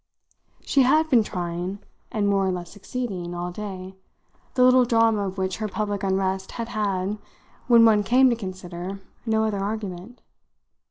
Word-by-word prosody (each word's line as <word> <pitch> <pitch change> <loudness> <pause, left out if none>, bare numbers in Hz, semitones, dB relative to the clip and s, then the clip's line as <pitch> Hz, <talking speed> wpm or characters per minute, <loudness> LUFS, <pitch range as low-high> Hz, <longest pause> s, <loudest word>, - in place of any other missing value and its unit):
She 275 - +2
had 305 +5 +3
been 240 -3 +6
trying, 180 -1 -4 0.3
and 210 -2 0
more 195 -1 +2
or - - +1
less 175 -1 -5
succeeding, 195 -4 -5
all 175 0 -4
day: 190 -1 -7 0.6
the 250 - +4
little 255 0 +6
drama 225 -4 +2
of 190 - -5
her 190 +3 -2
public 205 -1 -3
unrest 190 -1 -1
had 230 -1 -5
had, 205 -2 -1 0.5
when 235 -2 +7
one 215 -2 +5
came 250 +6 +4
to - - +1
consider, 185 -2 -6 0.3
no 220 0 +2
other 215 -2 -1
argument. 200 +1 -5
200 Hz, 155 wpm, -24 LUFS, 185-225 Hz, 0.6 s, when